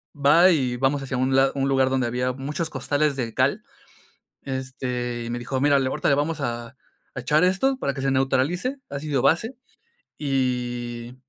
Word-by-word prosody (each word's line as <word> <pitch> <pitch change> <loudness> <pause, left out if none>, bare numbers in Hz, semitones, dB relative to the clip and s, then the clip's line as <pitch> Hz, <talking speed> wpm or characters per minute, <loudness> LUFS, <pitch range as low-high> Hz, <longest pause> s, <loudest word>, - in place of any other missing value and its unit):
va 150 +6 +6
y 130 -7 0
vamos 135 +2 +1
hacia 130 -1 -3
un 130 +1 +1
lado 135 0 +4
un 135 0 0
lugar 135 -1 +3
donde 130 -2 0
había 125 +2 -1
muchos 150 +5 -4
costales 145 +1 0
de 115 -4 -3
cal. - - +1 0.8
Este, 125 -2 -4
y - - -5
me 120 +1 -3
dijo, 130 +2 -3
mira, 145 0 +4
le 135 - 0
ahorita 150 +3 -1
le 140 - +4
vamos 150 +2 -1
a 120 +1 -4 0.4
a - - -5
echar 150 +7 +2
esto 190 +9 +2
para 140 - -1
que 135 - -7
se 135 - +1
neutralice, 135 - 0
ácido 140 -1 -2
base. 220 - +2 0.6
Y 125 -3 -2
135 Hz, 180 wpm, -24 LUFS, 125-145 Hz, 0.8 s, va